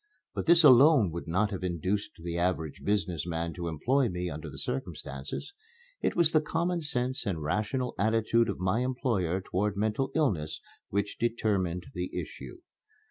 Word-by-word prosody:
But - - -4
this 170 0 +7
alone 135 - +7
would 85 +1 -6
not 95 +6 +1
have 95 -2 -4
induced 90 +1 -2
the 85 -1 -3
average 85 -3 -1
business 90 -6 -1
man 85 0 -2
to 85 0 -5
employ 120 - +1
me 90 -1 -3
under 75 0 -6
the - - -10
circumstances. 80 - -5 0.5
It - - 0
was 170 -2 +5
the 155 - +4
common 170 +3 -1
sense 130 -3 -1
and 85 -6 -2
rational 110 - -1
attitude 115 +2 +2
of 100 - -2
my 95 +5 +1
employer 120 - 0
toward 100 +2 -1
mental 110 +6 0
illness 95 - 0 0.3
which 100 +1 -2
determined 100 -7 0
the 90 0 -3
issue. - - -8
100 Hz, 160 wpm, -29 LUFS, 85-125 Hz, 0.5 s, this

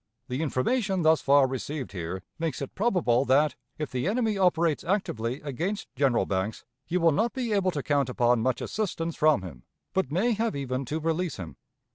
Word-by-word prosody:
The 125 +4 -2
information 190 - 0
thus 160 0 +4
far 140 0 +5
received 130 +1 -4
here 95 0 -5 0.2
makes 165 -1 -2
it 140 - -5
probable 180 - +2
that, 145 +3 +3 0.2
if 150 -5 -4
the 125 +5 -1
enemy 220 0 +1
operates 170 -5 +2
actively 130 - -1
against 170 +9 -4
General 135 -4 +2
Banks, 95 +3 -2 0.2
you 180 +1 0
will 165 -1 +5
not 225 +10 +1
be 245 -5 -2
able 195 -2 +2
to 150 -6 -3
count 140 -3 +1
upon 120 -1 +2
much 130 +2 0
assistance 170 -6 -2
from 155 -9 +3
him, 75 -9 -9 0.3
but 190 -8 0
may 200 +10 +2
have 225 -2 0
even 135 -1 -2
to 155 +6 -2
release 165 0 -1
him. 85 -4 -7
150 Hz, 185 wpm, -27 LUFS, 130-185 Hz, 0.3 s, far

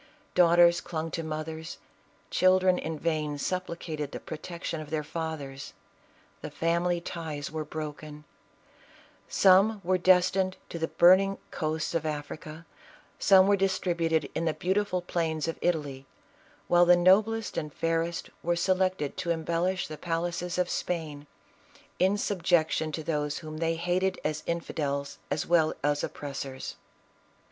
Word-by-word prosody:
Daughters 175 0 +5
clung 165 -1 -4
to 165 - -2
mothers, 160 +1 -5 0.5
children 185 0 +4
in 160 0 -4
vain 155 -2 -1
supplicated 170 -3 -4
the - - -6
protection 165 0 -6
of 150 - -9
their 155 -1 -1
fathers; 150 -4 -5 0.7
the - - -5
family 170 +1 0
ties 160 -4 -5
were 155 0 -3
broken; 150 0 -7 1.1
some 200 +3 +5
were 185 +1 +1
destined 185 +1 +3
to 170 - -6
the 165 - 0
burning 190 +4 +5
coast 155 0 -2
of 165 -2 0
Africa, 155 +1 -6 0.5
some 190 -2 +6
to 200 - +3
be 200 - +4
distributed 170 -5 0
in 165 - -2
the 160 -2 0
beautiful 185 +2 0
plains 160 -3 -1
of 165 - -4
Italy, 145 -6 -1 0.6
while 175 0 +5
the 175 - +8
noblest 210 +5 +3
and 150 -1 -3
fairest 165 +2 -2
were 175 +1 0
selected 185 -4 0
to 185 -2 -3
embellish 170 +3 0
the 155 -1 -8
palaces 175 +1 -2
of 180 -1 +2
Spain, 155 -5 -3 0.7
in 190 +3 +3
subjection 170 -5 +1
to 160 +1 -4
those 150 -2 -1
whom 155 -1 -7
they 165 0 0
hated 180 +3 0
as 155 0 -2
infidels 140 -4 -3
as 145 - -1
well 165 -2 +3
as 145 0 +1
oppressors. 135 -2 -5
165 Hz, 135 wpm, -28 LUFS, 155-180 Hz, 1.1 s, the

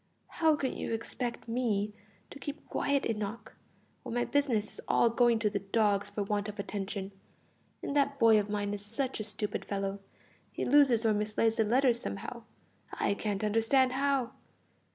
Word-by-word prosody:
"How 320 -2 +3
can 270 -3 -2
you - - -3
expect 235 +2 -3
me 220 -4 0 0.4
to 280 - -9
keep 290 +2 -7
quiet, 280 -1 0
Enoch, 215 0 -4 0.5
when 230 - -6
my 245 - +1
business 255 -8 +1
is - - -7
all 235 - +4
going 240 0 +4
to 220 -1 +1
the 205 -1 -1
dogs 205 0 +1
for 205 0 -2
want 205 0 -1
of 210 - -8
attention? 200 -1 -4 0.7
And 280 - -3
that 280 -1 +2
boy 225 -4 +6
of 205 0 -3
mine 205 -1 -1
is 205 -1 -5
such 240 +5 -2
a - - -2
stupid 210 0 -3
fellow; 195 0 -3 0.5
he - - -3
loses 255 -4 +5
or 220 - +4
mislays 215 +2 +1
the 225 - +4
letters 240 +2 +3
somehow 230 +2 -6 0.5
I - - 0
can't 205 0 -3
understand 225 +5 +3
how. 270 -2 +1
225 Hz, 175 wpm, -31 LUFS, 205-250 Hz, 0.7 s, boy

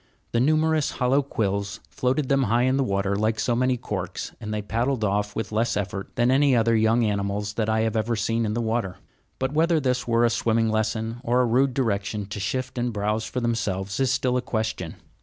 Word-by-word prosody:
The 120 - +1
numerous 155 +2 +2
hollow 130 +2 +2
quills 100 -5 -2
floated 130 +2 -1
them 135 -1 +2
high 120 +4 +2
in 130 +1 +2
the 135 - +2
water, 100 -3 0
like 110 +2 0
so 120 - +1
many 130 +1 +1
corks, - - -4
and 105 - -5
they 105 -1 -2
paddled 115 +3 -1
off 105 0 0
with 110 - -3
less 110 0 0
effort 100 -1 -4
than 120 +1 +3
any 135 0 +4
other 115 0 +3
young 110 +2 +3
animals 100 0 -1
that 110 0 -1
I 110 0 +2
have 110 0 0
ever 110 +2 0
seen 115 +2 0
in 105 -1 -1
the 120 - 0
water. 110 -4 -1 0.4
But 130 +1 -2
whether 165 +1 +3
this 130 -3 -1
were 115 0 +3
a 120 - +2
swimming 115 -1 +1
lesson, 110 +2 -1
or 125 0 +2
a - - +3
rude 125 +2 +2
direction 105 -4 -1
to 105 - -5
shift 130 +6 -3
and 120 0 0
browse 105 +1 -1
for 125 - -3
themselves, 100 -5 -2
is 135 -1 +2
still 125 -1 +1
a - - 0
question. 110 -8 -3
115 Hz, 215 wpm, -25 LUFS, 105-125 Hz, 0.4 s, any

